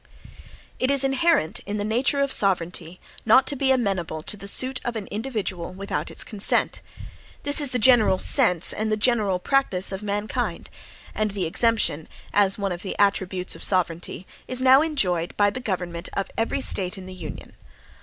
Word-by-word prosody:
It 255 - +1
is 275 -1 +4
inherent 270 - +1
in 205 +1 -3
the 205 - -2
nature 250 +6 0
of 275 -1 0
sovereignty 180 -3 0 0.2
not 265 - +5
to 285 - -1
be 270 0 0
amenable 190 -10 -1
to - - 0
the 200 -1 -8
suit 260 +5 +3
of 240 - -4
an 215 -3 -4
individual 205 -7 -4
without 195 +1 -4
its - - -2
consent. 205 -2 +1 0.6
This 285 +1 +4
is 285 - +2
the 250 - -1
general 230 -5 +4
sense, 180 -2 +3
and 215 0 -2
the 215 - +1
general 210 -4 +1
practice 195 -4 0
of 190 +1 -5
mankind; 205 0 -3 0.4
and 215 0 -1
the 195 -3 -3
exemption, 190 -4 +1 0.3
as 200 -1 +3
one 200 -2 -2
of 175 0 -5
the 190 - -6
attributes 190 -2 0
of - - -12
sovereignty, 180 -1 -1 0.2
is 255 0 +2
now 260 +1 +6
enjoyed 180 - -1
by 205 -1 +3
the 255 - -6
government 180 -6 -4
of 195 - -3
every 225 +4 -1
State 190 -5 +1
in 190 - -9
the 185 - -9
Union. 170 -4 -9
205 Hz, 180 wpm, -23 LUFS, 185-250 Hz, 0.6 s, now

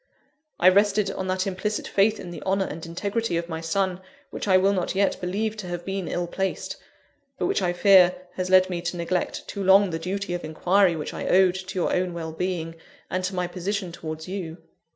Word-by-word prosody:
I 180 - +5
rested 200 +1 +3
on 190 - -4
that 185 0 0
implicit 205 +2 -2
faith 210 +2 +2
in 175 - -7
the 175 - -8
honour 195 0 +1
and 160 -1 -7
integrity 200 +3 -2
of 170 0 -3
my 160 -1 -5
son, 185 +2 -1 0.3
which - - -5
I 185 -1 +6
will 195 +2 +3
not 185 -1 -1
yet 200 0 +1
believe 210 +5 -1
to 200 -4 -6
have 175 -1 -5
been 195 -2 -3
ill 175 - -1
placed, 190 +2 -3 0.6
but - - -1
which, - - +1
I 180 -2 +1
fear, 180 0 +6 0.2
has 185 0 -3
led 185 0 +6
me 180 -2 -3
to 175 +1 -3
neglect 175 +1 -2
too 200 - -4
long 195 0 +5
the 165 - -3
duty 190 +2 -3
of 175 - -4
inquiry 175 +3 +2
which 155 - -5
I - - -4
owed 185 -1 +5
to 190 +1 -7
your 180 - +1
own 180 -1 0
well 160 -1 -4
being, 165 -1 -3 0.3
and 185 0 -1
to 190 +1 -3
my 180 0 0
position 185 +1 -3
towards 160 -1 -7
you. 180 -4 -5
185 Hz, 215 wpm, -25 LUFS, 175-195 Hz, 0.6 s, I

